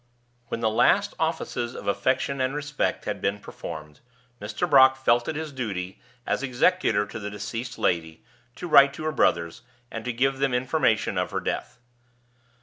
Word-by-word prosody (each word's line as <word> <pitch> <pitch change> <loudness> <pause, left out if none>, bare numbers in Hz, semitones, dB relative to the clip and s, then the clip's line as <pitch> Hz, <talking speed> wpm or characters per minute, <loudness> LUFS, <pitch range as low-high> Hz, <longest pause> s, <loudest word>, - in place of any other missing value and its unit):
When 115 - -4
the 110 - +2
last 200 - +3
offices 160 -7 -2
of - - -8
affection 130 +6 0
and 130 +2 0
respect 150 0 -2
had - - -3
been 100 +1 0
performed, 75 -6 -9 0.4
Mr. 105 0 -2
Brock 130 -2 +7
felt 120 -2 +2
it - - -2
his 155 0 -4
duty, 100 -8 -5 0.2
as - - -1
executor 130 - +2
to 105 +2 -8
the 105 -1 -5
deceased 115 +4 -6
lady, 80 -2 -1 0.3
to 175 - -6
write 140 -3 +6
to 155 - -7
her 155 - 0
brothers, 85 - +1 0.3
and 115 - -5
to 125 - -1
give 135 +3 0
them 135 -2 +1
information 125 -3 +1
of - - -1
her - - -2
death. - - -4
125 Hz, 170 wpm, -25 LUFS, 105-140 Hz, 0.4 s, Brock